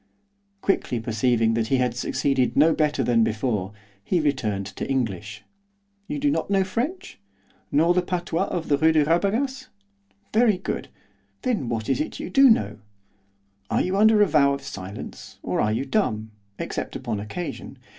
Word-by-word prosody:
Quickly 125 -10 0
perceiving 115 0 +1
that 115 -1 0
he 135 - +2
had 125 -2 0
succeeded 135 +1 0
no 160 +3 +6
better 150 -3 +1
than 115 -1 +3
before, 110 -4 -1 0.3
he 175 - +1
returned 120 -10 -1
to - - -6
English. 110 -5 -2 0.6
'You 295 - -3
do 290 0 +1
not - - -1
know 195 -1 +3
French? 245 - -4 0.5
nor 165 +4 +4
the 180 - +2
patois 175 0 -1
of 170 -2 -3
the 145 -1 +2
Rue 160 0 +4
de 155 -2 +4
Rabagas? 225 - 0 0.7
Very 220 -3 +4
good, 185 - -4 0.6
then 215 - -1
what 115 -2 -2
is 135 0 +1
it - - +1
that - - -9
you - - -6
do 270 +5 +7
know? 105 - +2 0.9
Are - - +2
you 185 +1 -1
under 215 +1 +5
a - - +3
vow 140 -4 +4
of 140 - -10
silence, 100 -5 -8
or - - 0
are 105 - +1
you 120 +5 -1
dumb, 110 - -1 0.3
except - - -4
upon 105 - -3
occasion? 140 - -6
140 Hz, 170 wpm, -24 LUFS, 115-185 Hz, 0.9 s, do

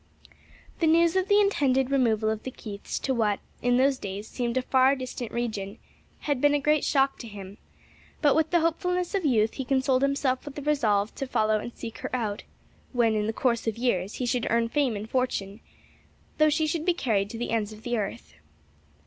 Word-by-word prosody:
The 330 - +2
news 335 +2 +4
of 375 0 +1
the 405 0 +5
intended 275 -10 +2
removal 225 -5 +2
of 220 0 -3
the - - -5
Keiths 205 -5 -6
to 265 - +1
what, 215 -4 +1 0.2
in 245 0 +2
those 265 0 +3
days, 200 +2 -6
seemed 240 -1 -2
a 255 - +1
far 260 +1 +4
distant 255 -3 -6
region, 215 -3 -3 0.4
had 285 -4 -1
been 290 0 +4
a - - +2
great 300 +1 +2
shock 270 -1 +2
to 235 - -7
him; 200 -1 -10 0.6
but 290 -3 +4
with 320 0 +2
the 345 -2 +3
hopefulness 360 +3 0
of 390 -4 0
youth 220 -4 +2
he 270 - -4
consoled 265 0 +1
himself 275 -2 +1
with 290 -1 -9
the 290 - -6
resolve 220 -9 +1
to 275 - -5
follow 215 -3 +1
and 235 - -7
seek 230 -2 -8
her - - -4
out 215 -4 -2 0.5
when 235 -3 +3
in 210 -1 0
the - - +1
course 235 0 0
of 225 - -1
years 205 -6 -1
he 250 - -2
should 240 -1 0
earn 230 0 +1
fame 270 -4 +1
and 205 +1 -5
fortune 215 -6 -1 0.8
though 310 0 +6
she 305 +1 +1
should 310 0 -1
be 355 0 +2
carried 205 - 0
to 230 - -7
the 240 - -3
ends 220 -2 0
of 215 0 -12
the 240 0 -1
earth. 195 - -4
250 Hz, 210 wpm, -27 LUFS, 220-285 Hz, 0.8 s, though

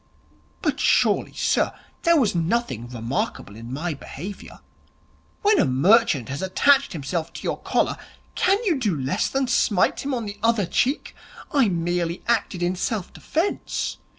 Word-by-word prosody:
'But, - - 0
surely, - - +2
sir, - - +1 0.3
there 335 -1 +4
was 235 -7 +2
nothing 170 - -1
remarkable 115 -3 -3
in 115 +2 -9
my 160 +5 -2
behaviour? 175 +7 -9 0.8
When 415 -1 +4
a - - +4
merchant 160 - +3
has 140 +1 -4
attached 275 +9 +3
himself 160 +2 -3
to - - -8
your - - -2
collar, - - 0 0.4
can 385 +2 +3
you 345 - +1
do 200 - 0
less 140 +11 0
than 270 0 0
smite 210 -6 +2
him 275 -1 -2
on 235 -2 -3
the 205 0 -7
other 225 -3 +2
cheek? 260 - 0 0.4
I 270 -7 +3
merely 170 0 -1
acted 210 -6 0
in 175 +1 0
self 195 0 -3
defence. 330 +6 -2
185 Hz, 150 wpm, -23 LUFS, 160-240 Hz, 0.8 s, there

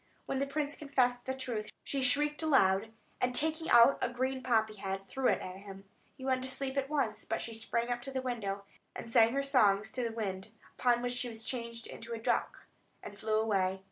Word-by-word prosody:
When 270 - -2
the 275 - 0
prince 290 +1 -2
confessed 255 -4 0
the 260 - 0
truth, 240 -5 -4
she 275 - -2
shrieked 295 +4 +2
aloud, 220 -9 +3 0.3
and 250 0 +1
taking 315 +3 +1
out 240 +3 +7
a - - +1
green 260 +2 -2
poppy 220 -4 +1
head, 195 0 -4
threw 265 +3 0
it - - +2
at 185 0 -7
him. 195 0 -10 0.3
He 260 - -8
went 260 -1 +1
to 260 - -2
sleep 265 0 -4
at 275 0 -1
once; 230 -8 -1
but 225 - -2
she 230 - -4
sprang 230 +2 -2
up 240 0 -1
to 270 +2 -6
the 265 - -1
window, 200 -6 -3 0.4
sang 230 0 +4
her 275 0 +1
songs 215 -7 +3
to 255 - -2
the 230 - -1
winds; 195 -4 -4 0.3
upon 240 -1 +3
which 245 0 -1
she 245 0 -1
was 225 -1 -8
changed 235 -1 -4
into 230 +1 -8
a - - -2
duck, 225 - -1 0.4
and 205 -1 -9
flew 215 0 +1
away. 195 -4 +1
240 Hz, 215 wpm, -32 LUFS, 215-265 Hz, 0.4 s, out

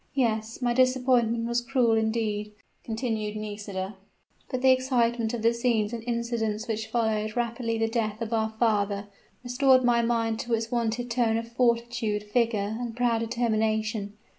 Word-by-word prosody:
"Yes 230 -2 0
my 240 -1 +2
disappointment 250 -2 +2
was 235 +1 +1
cruel 245 -1 +2
indeed," 220 -2 0 0.3
continued 220 -2 -2
Nisida. 205 -2 -5 0.5
"But 255 -1 -3
the 260 - +7
excitement 240 -3 +1
of 225 - -5
the 230 +1 +4
scenes 235 -2 0
and 230 -1 -4
incidents 235 -2 -2
which 220 -1 -2
followed 220 -2 0
rapidly 235 -1 -1
the 225 0 +1
death 220 -2 -2
of 230 0 -3
our 220 -1 +1
father, 205 -3 +1 0.3
restored 255 +1 +4
my 240 -1 +4
mind 230 -1 0
to 235 -1 0
its 225 0 -4
wonted 240 0 -1
tone 230 -2 +2
of 230 0 -4
fortitude, 235 -3 0
vigor, 220 -3 +1
and 240 -1 -5
proud 240 -2 +2
determination. 220 -2 -1
230 Hz, 155 wpm, -27 LUFS, 220-240 Hz, 0.5 s, the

